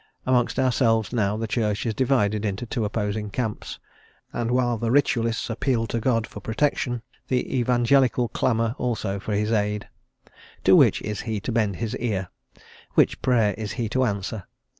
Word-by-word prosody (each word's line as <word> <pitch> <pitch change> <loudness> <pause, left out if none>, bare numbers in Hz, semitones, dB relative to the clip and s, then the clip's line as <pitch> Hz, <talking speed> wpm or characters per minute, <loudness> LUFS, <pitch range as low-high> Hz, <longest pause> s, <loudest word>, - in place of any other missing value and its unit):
Amongst 125 -2 +2
ourselves, 115 -4 +2
now, 105 -3 +1
the 115 - -2
Church 105 -1 -1
is 115 - 0
divided 110 -5 +1
into 105 +3 -2
two 115 -1 -2
opposing 105 0 -2
camps, 110 0 -4 0.6
and 115 -1 -2
while 120 -2 +1
the 115 - -1
Ritualists 115 -3 +1
appeal 115 0 0
to 115 - -2
God 115 -1 +1
for - - -10
protection, 120 0 -1 0.2
the 130 0 -1
Evangelical 125 0 +3
clamour 115 0 0
also 110 -5 -2
for 105 +1 -3
his 105 +2 0
aid. 105 -1 0 0.8
To - - +6
which - - +4
is 105 -1 -3
he 110 -3 -3
to 120 - -3
bend 110 -4 +1
his 115 +1 -3
ear? 100 -6 -2 0.7
which - - +3
Prayer 115 -5 +3
is 110 -1 -4
he 115 -1 -2
to 130 +3 +1
answer? 100 -2 -3
115 Hz, 165 wpm, -24 LUFS, 105-120 Hz, 0.8 s, To